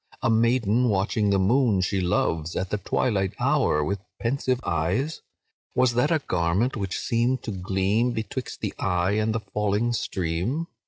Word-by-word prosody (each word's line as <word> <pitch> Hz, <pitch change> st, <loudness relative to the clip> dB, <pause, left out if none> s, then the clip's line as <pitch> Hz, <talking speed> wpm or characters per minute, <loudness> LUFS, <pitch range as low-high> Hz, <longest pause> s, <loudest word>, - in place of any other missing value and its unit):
A -, -, +3 dB
maiden, 115 Hz, +1 st, +3 dB
watching 100 Hz, +1 st, +1 dB
the 100 Hz, -, +3 dB
moon 105 Hz, +1 st, +3 dB
she 95 Hz, +1 st, 0 dB
loves, 85 Hz, -2 st, 0 dB
At 95 Hz, 0 st, -2 dB
the 105 Hz, -, 0 dB
twilight 100 Hz, -1 st, 0 dB
hour, 75 Hz, 0 st, +2 dB
with 100 Hz, +6 st, -2 dB, 0.2 s
pensive 130 Hz, +1 st, 0 dB
eyes? 90 Hz, -, -1 dB, 0.5 s
Was 125 Hz, -1 st, +3 dB
that 125 Hz, +5 st, +2 dB
a 165 Hz, -, +3 dB
garment 95 Hz, -, 0 dB
which 100 Hz, -4 st, -3 dB
seemed 120 Hz, +3 st, 0 dB
to 110 Hz, -, -4 dB
gleam 95 Hz, +5 st, 0 dB
Betwixt 120 Hz, +3 st, -5 dB
the -, -, -2 dB
eye 90 Hz, 0 st, +1 dB
and 110 Hz, +1 st, +1 dB
the 115 Hz, -, -1 dB
falling 105 Hz, +3 st, 0 dB
stream? 95 Hz, -, -2 dB
105 Hz, 160 wpm, -25 LUFS, 95-120 Hz, 0.5 s, A